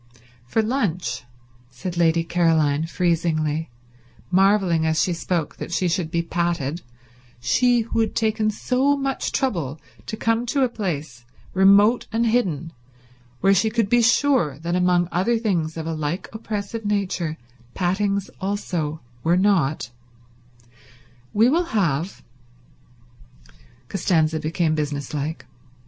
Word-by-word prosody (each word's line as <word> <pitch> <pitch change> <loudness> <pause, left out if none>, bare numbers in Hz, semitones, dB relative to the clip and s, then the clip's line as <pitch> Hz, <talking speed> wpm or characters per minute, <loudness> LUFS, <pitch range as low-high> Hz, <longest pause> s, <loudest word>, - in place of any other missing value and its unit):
"For 220 - +1
lunch," 210 - -1 0.4
said 150 +8 -6
Lady 165 -1 +3
Caroline 160 -3 +2
freezingly, 160 -3 0 0.6
marveling 190 -3 +3
as 160 0 +1
she 180 - +2
spoke 170 -2 -2
that - - -6
she 180 +1 +1
should 170 -1 -1
be 170 0 0
patted, 170 -2 -1 0.6
she 240 - +3
who 230 0 -2
had 225 - 0
taken 220 -1 +1
so 260 +6 +1
much 270 -1 -2
trouble 165 - -1 0.3
to 220 - -4
come 230 +2 0
to 275 +2 +1
a 255 - +2
place, 155 - -4 0.3
remote 200 +5 +5
and 230 +1 +1
hidden, 175 - 0 0.7
where 195 +1 +5
she 220 +3 +2
could 220 -2 0
be 240 +1 +4
sure 245 - +3
that 170 +3 -2
among 180 -1 +3
other 210 +7 +1
things 175 -8 -1
of 160 - -4
a 165 - -2
like 155 +3 -3
oppressive 220 0 -4
nature 190 -6 -1 0.4
pattings 195 +2 0
also 175 -6 -2 0.2
were 170 +2 +3
not, 165 -10 +1 1.4
"we 220 +3 +4
will 335 +7 +2
have—" 170 -1 -1 1.6
Costanza 160 -3 +1
became 160 +1 0
business 145 -2 -3
like. 150 +2 -3
180 Hz, 130 wpm, -23 LUFS, 160-215 Hz, 1.6 s, remote